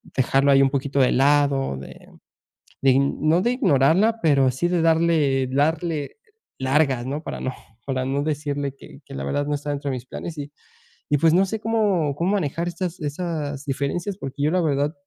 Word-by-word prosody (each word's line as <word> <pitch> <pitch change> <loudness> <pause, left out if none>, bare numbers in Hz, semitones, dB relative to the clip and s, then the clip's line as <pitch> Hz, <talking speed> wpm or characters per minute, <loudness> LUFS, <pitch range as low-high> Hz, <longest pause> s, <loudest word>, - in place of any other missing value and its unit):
dejarlo 135 +2 +3
ahí 135 0 +6
un 135 - +3
poquito 140 0 -1
de 125 - +4
lado, 140 - +2
de 70 - -9 0.9
ign 135 +1 +3
no 170 +3 +4
de 240 +2 +1
ignorarla, 195 - +3
pero 140 -5 +4
sí 155 +7 -1
de 175 -2 +1
darle 160 -5 +2
darle 155 - -1 0.4
largas, 130 -2 +1
¿no? 145 +4 -4
Para - - -6
no 130 - -3 0.3
para 130 -1 -1
no 140 +1 -1
decirle 145 -2 -2
que - - -14
que - - -10
la 70 - -4
verdad 145 - -1
no 150 - -1
está 145 0 -4
dentro 140 -1 -3
de 130 - -2
mis 125 +1 -9
planes 160 +2 -7
y 145 0 -6 0.6
y 145 - +3
pues 165 +1 +4
no 190 +2 +5
sé 220 +3 -3
cómo 205 -10 +1
cómo 170 +4 0
manejar 170 -2 -1
estas 175 0 -4
esas 150 -2 -4
diferencias 145 +8 -2
porque 135 +1 -6
yo 150 - +2
la 185 - +2
verdad 145 -1 0
145 Hz, 190 wpm, -23 LUFS, 135-165 Hz, 0.9 s, ahí